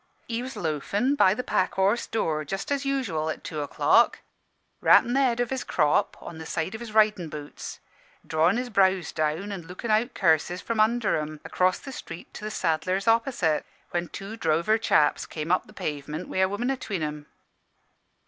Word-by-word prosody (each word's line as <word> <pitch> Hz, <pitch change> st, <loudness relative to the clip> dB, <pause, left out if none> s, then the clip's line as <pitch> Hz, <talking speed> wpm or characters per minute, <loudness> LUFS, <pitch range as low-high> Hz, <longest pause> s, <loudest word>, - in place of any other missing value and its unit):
"He 230 Hz, 0 st, -2 dB
was 260 Hz, +1 st, -6 dB
loafin' 180 Hz, -, 0 dB
by 195 Hz, -9 st, +4 dB
the 250 Hz, -, -3 dB
Pack 185 Hz, -, 0 dB
Horse 200 Hz, +5 st, +2 dB
door, 155 Hz, -8 st, -1 dB
just 195 Hz, -, -4 dB
as 280 Hz, 0 st, 0 dB
usual, 200 Hz, -, -1 dB
at 155 Hz, -, -5 dB
two 155 Hz, -2 st, -4 dB
o'clock, 145 Hz, -, +3 dB, 0.6 s
rappin' 240 Hz, -, +6 dB
the 270 Hz, -, +3 dB
head 245 Hz, -3 st, +2 dB
o' 245 Hz, -, +3 dB
his 260 Hz, +2 st, -3 dB
crop 150 Hz, -3 st, +1 dB
on 160 Hz, -, -9 dB
the 160 Hz, -, -7 dB
side 160 Hz, +6 st, -2 dB
o' -, -, -6 dB
his 235 Hz, -2 st, -7 dB
ridin' 210 Hz, -6 st, +3 dB
boots, 150 Hz, -1 st, -8 dB, 0.5 s
drawin' 165 Hz, +6 st, +2 dB
his 245 Hz, 0 st, -3 dB
brows 190 Hz, -3 st, +3 dB
down 155 Hz, +6 st, -1 dB
an' 195 Hz, -3 st, -5 dB
lookin' 185 Hz, +5 st, -4 dB
out 230 Hz, +4 st, +2 dB
curses 170 Hz, 0 st, +2 dB
from 230 Hz, +2 st, -3 dB
under 225 Hz, +1 st, +3 dB
'em 155 Hz, 0 st, -5 dB
across 185 Hz, 0 st, +2 dB
the 270 Hz, -, -9 dB
street 165 Hz, -9 st, -9 dB
to -, -, -9 dB
the 215 Hz, -, -3 dB
saddler's 185 Hz, +1 st, -1 dB
opposite, 225 Hz, -, +2 dB, 0.3 s
when 175 Hz, 0 st, -1 dB
two 200 Hz, +5 st, -7 dB
drover 170 Hz, +3 st, +2 dB
chaps 150 Hz, -9 st, +2 dB
came 155 Hz, +1 st, -4 dB
up 185 Hz, -, +2 dB
the -, -, -15 dB
pavement 150 Hz, -3 st, -5 dB
wi' -, -, -5 dB
a 190 Hz, 0 st, +4 dB
woman 240 Hz, +6 st, -1 dB
atween 215 Hz, -10 st, -3 dB
'em. 150 Hz, -1 st, -5 dB
190 Hz, 190 wpm, -26 LUFS, 160-230 Hz, 0.6 s, rappin